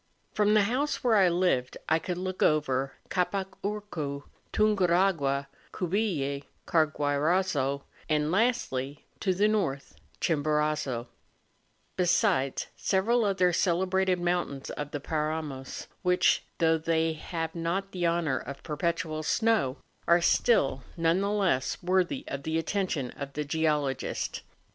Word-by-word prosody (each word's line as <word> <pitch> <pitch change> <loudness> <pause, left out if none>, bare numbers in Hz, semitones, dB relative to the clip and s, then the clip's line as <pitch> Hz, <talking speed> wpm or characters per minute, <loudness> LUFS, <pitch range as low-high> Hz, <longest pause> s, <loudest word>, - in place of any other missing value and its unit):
From 210 0 +3
the 210 - +5
house 255 +8 -1
where 240 -3 +4
I 190 -3 +5
lived 170 -8 +1
I 160 +1 +3
could 180 +1 -4
look 185 0 -4
over 135 -3 +2 0.2
Capac 190 +1 0
Urcu, 175 -9 -4 0.3
Tunguragna, 180 -9 +2 0.3
Cubille, 170 -7 -1 0.2
Carguairazo, 150 -2 +1 0.3
and 150 0 +1
lastly, 175 - 0
to 195 - +1
the 205 +3 +3
north, 180 -11 -1 0.2
Chimborazo; 150 -5 0 0.9
besides 175 - +2
several 225 +5 +2
other 185 -3 +2
celebrated 185 +1 +1
mountains 175 -6 -1
of 145 -1 -5
the 145 - -4
Paramos, 150 -3 -3 0.2
which, 180 -1 +3
though 165 -1 +3
they 160 0 +1
have 165 0 -4
not 180 +4 -2
the 175 -2 0
honour 165 -6 +1
of 140 - -8
perpetual 160 0 -2
snow, 210 - +1 0.3
are 170 +1 +6
still 170 - +3 0.2
none 165 +3 +2
the 200 - 0
less 190 -11 +1
worthy 185 +9 +1
of 140 - -4
the 160 +3 -1
attention 165 -6 -1
of 140 0 -7
the 150 - -2
geologist. 150 -3 -1
170 Hz, 125 wpm, -28 LUFS, 145-190 Hz, 0.9 s, are